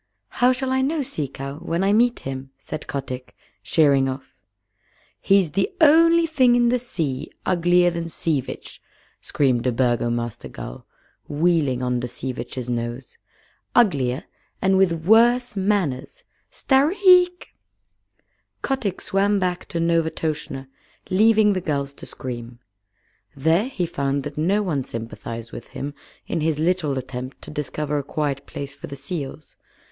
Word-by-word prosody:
"How 250 +1 +3
shall 260 +1 -1
I 260 0 +2
know 290 +2 0
Sea 155 - -3
Cow 140 +2 -7
when 170 +1 -1
I 200 +1 +3
meet 240 +2 +3
him?" 135 0 -6
said 150 +3 -7
Kotick, 130 -2 -5 0.3
sheering 140 -4 +3
off. 130 +1 -7 0.9
"He's 195 -5 +3
the 195 +5 0
only 330 +2 +6
thing 260 -7 +4
in 240 -1 +4
the 250 +1 +2
sea 155 - -3 0.2
uglier 175 0 +3
than 170 0 -4
Sea 155 -3 0
Vitch," - - -9 0.4
screamed 130 -4 +1
a - - +3
Burgomaster 120 -1 -1
gull, - - -9 0.4
wheeling 145 -5 +1
under 125 -1 -1
Sea 130 +2 -5
Vitch's 125 0 -6
nose. 120 +1 -4 0.6
"Uglier, 140 - +3 0.4
and 190 0 +3
with 170 -4 +2
worse 240 +3 +4
manners! 190 -10 -1 0.3
Stareek!" 360 +5 +4 1.1
Kotick 225 -9 -1
swam 200 +1 +2
back 180 -2 -1
to 170 - -3
Novastoshnah, 160 -4 -1 0.4
leaving 215 +1 +5
the 185 - -2
gulls 140 -3 -2
to - - -11
scream. 120 -2 -7 0.8
There 160 - +2
he 195 -9 -2
found 140 -4 -1
that 145 +1 -6
no 190 +7 +1
one 150 -8 -1
sympathized 115 0 -7
with 120 - -8
him 145 +1 -4 0.3
in 165 - -2
his 155 -1 +1
little 160 -3 +1
attempt 130 0 -6
to - - -8
discover 150 0 -2
a - - -4
quiet 140 -1 -3
place 140 0 -6
for - - -9
the 140 - -7
seals. 140 +1 -6
160 Hz, 140 wpm, -23 LUFS, 135-200 Hz, 1.1 s, only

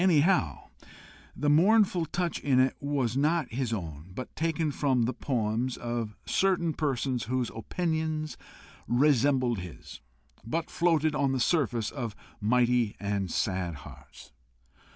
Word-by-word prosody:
Anyhow, 160 - +2 0.7
the 145 - -2
mournful 180 +2 +4
touch 175 +1 -2
in 135 -3 +2
it 130 +1 +3
was 140 -5 -1
not 155 +3 +1
his 125 -1 -1
own, 85 -5 -5
but 130 - -7
taken 160 -1 0
from 130 -3 +1
the 125 +3 0
poems 120 0 -1
of 120 -3 -3
certain 175 -4 +1
persons 135 -5 -1
whose 125 0 -1
opinions 155 +4 -2 0.5
resembled 130 -3 +3
his, 90 -3 -10 0.4
but 165 +8 -3
floated 160 -3 +2
on 140 -2 +1
the 130 - 0
surface 120 -6 +1
of 120 -7 -5 0.2
mighty 120 0 +2
and 100 -2 -2
sad 90 -2 -1
hearts. 70 -2 -13
130 Hz, 130 wpm, -29 LUFS, 115-155 Hz, 0.7 s, mournful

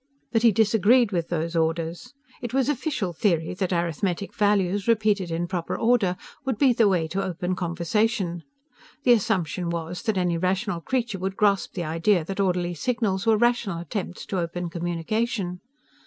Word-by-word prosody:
But 225 - +2
he 230 -1 +6
disagreed 225 +2 +4
with 170 -3 -1
those 170 0 -2
orders. 165 +6 -1 0.3
It 240 +1 -4
was 270 0 +2
official 260 - -1
theory 165 -2 0
that 185 0 -2
arithmetic 175 +2 -1
values, 205 -1 +1
repeated 210 -5 +2
in 165 +1 -1
proper 175 -2 -3
order, 225 -6 +2 0.3
would 265 -5 -1
be 260 +1 +4
the 225 -2 +4
way 175 -5 +1
to 195 +4 -1
open 180 0 -2
conversation. 180 +1 -1 0.6
The 245 - +6
assumption 190 -5 0
was 170 +1 -4
that 220 -4 -1
any 175 -2 +1
rational 185 0 -1
creature 235 -3 -2
would 190 +1 -3
grasp 200 -2 +2
the 175 - -2
idea 165 +2 +1
that 195 +3 -5
orderly 180 -2 +1
signals 210 +1 -1
were 220 -1 +5
rational 240 -5 +1
attempts 180 +2 -5
to 190 - -2
open 170 0 -3
communication. 180 +3 -2
190 Hz, 165 wpm, -25 LUFS, 175-220 Hz, 0.6 s, he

